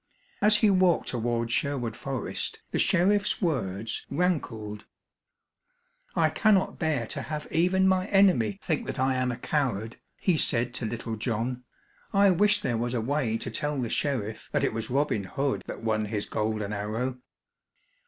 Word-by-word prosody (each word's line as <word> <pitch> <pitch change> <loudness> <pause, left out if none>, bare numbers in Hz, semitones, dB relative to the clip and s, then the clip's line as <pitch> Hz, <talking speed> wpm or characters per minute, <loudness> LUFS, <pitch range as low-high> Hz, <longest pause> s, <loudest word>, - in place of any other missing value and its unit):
As 210 +1 +6
he 215 -2 +4
walked 185 -3 +3
toward 120 -1 -1
Sherwood 120 -4 0
Forest, 130 -2 -4
the - - -1
sheriff's 200 +3 +3
words 110 - -2
rankled. 115 - -2 1.3
"I - - +3
cannot 205 -3 +2
bear 155 -8 0
to - - -4
have 150 -1 -5
even 185 +3 +3
my 185 0 +2
enemy 180 - +4
think - - -1
that - - -4
I 130 +1 +2
am 130 -1 0
a 120 - -5
coward," 115 -7 -1 0.2
he 180 -4 +1
said 120 -4 +2
to 125 -2 -2
Little 115 0 -4
John. 120 +2 -2 0.5
"I 200 -1 +5
wish 205 +4 +3
there 120 - 0
was 120 +1 -1
a - - +1
way 120 -1 0
to - - -5
tell 150 -1 -1
the 120 -3 -2
sheriff 115 -7 -2
that - - +1
it - - +1
was 110 0 -4
Robin 130 -6 0
Hood 135 +9 -1
that - - -7
won 110 -1 0
his 105 -1 -2
golden 105 -1 -2
arrow." 115 +5 -3
125 Hz, 165 wpm, -27 LUFS, 110-165 Hz, 1.3 s, As